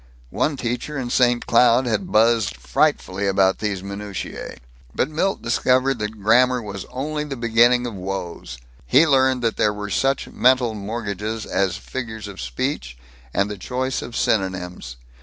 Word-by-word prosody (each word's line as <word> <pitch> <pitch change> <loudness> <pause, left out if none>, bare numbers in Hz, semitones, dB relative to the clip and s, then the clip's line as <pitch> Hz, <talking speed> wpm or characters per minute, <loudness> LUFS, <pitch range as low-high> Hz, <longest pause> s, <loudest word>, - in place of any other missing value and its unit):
One 145 -2 0
teacher 125 +5 -3
in 125 -2 -3
St. 120 -1 +3
Cloud 120 +1 +4
had 150 - -2
buzzed 110 - +3
frightfully 95 +9 0
about 95 0 +2
these 100 -3 -2
minutiæ. 100 0 -6 0.4
But 135 - 0
Milt 190 +5 -1
discovered 130 +2 +2
that 105 0 -4
grammar 125 +5 +4
was 100 -4 -7
only 150 +3 -3
the 145 -2 -5
beginning 120 +1 +3
of 120 - -4
woes. 90 -9 -6 0.3
He 145 +5 +6
learned 130 -4 +3
that 115 -1 0
there 105 - +3
were 105 -1 -6
such 135 +5 +1
mental 125 -2 +3
mortgages 105 0 -4
as 95 -2 0
figures 110 -4 -6
of 100 -2 -8
speech 130 - -3 0.3
and 100 +8 +1
the 105 -2 -7
choice 130 +3 -2
of 120 - -6
synonyms. 90 - -2
115 Hz, 155 wpm, -22 LUFS, 100-130 Hz, 0.4 s, He